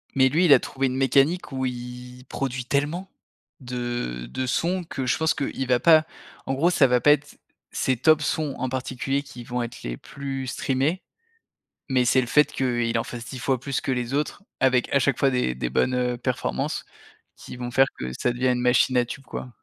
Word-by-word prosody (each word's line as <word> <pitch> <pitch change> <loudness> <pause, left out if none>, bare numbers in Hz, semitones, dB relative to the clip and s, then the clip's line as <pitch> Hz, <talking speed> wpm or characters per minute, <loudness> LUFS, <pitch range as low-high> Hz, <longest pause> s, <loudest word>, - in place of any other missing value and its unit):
Mais, 130 -1 +5
lui, 165 +7 +3
il 150 - +8
a - - +7
trouvé 135 0 -2
une 130 - -3
mécanique 135 +7 +2
où 130 -1 -2
il 125 0 -7
produit 130 -2 -3
tellement 150 +8 -1 0.5
de 120 - -4
de 130 - -3
sons 175 +8 0
que 135 -5 -5
je 125 - +1
pense 160 -1 +2
qu'il 135 -2 -3
va 125 -1 +3
pas 155 0 +6 0.4
en 135 - -1
gros, 150 +6 +3
ça 170 -5 +4
va 125 0 +3
pas 145 - +6
être 150 0 -5 0.3
ses 130 - 0
top 155 +5 +4
sons 150 -2 -1
en 130 - -2
particulier, 130 +2 -2
qui 135 -3 -10
vont 125 0 -3
être 120 - -8
les - - -4
plus 135 -1 -6
streamés 135 +7 -1 0.9
mais 130 -1 +3
c'est 130 +2 +4
le - - -3
fait 150 +5 +4
qu'il 120 -3 0
en - - -1
fasse 120 -1 -7
10 130 - -7
fois 130 +1 0
plus 135 +2 -3
que - - -3
les 125 -1 -2
autres, 150 +7 -2 0.2
avec 130 -2 +2
à - - +6
chaque 135 -2 +1
fois 135 - +3
des 125 - 0
des 60 0 -3
bonnes, 125 - +1
heu, 125 -1 0
performances, 125 0 -2 0.5
qui - - -10
vont 120 0 -5
faire 135 +2 +5
que 65 0 -4
ça 125 - +1
devient 125 +1 0
une 125 -1 +1
machine 125 +1 +3
à 120 - +3
tube, 135 +3 -8
quoi. 130 - -6
130 Hz, 215 wpm, -24 LUFS, 125-140 Hz, 0.9 s, il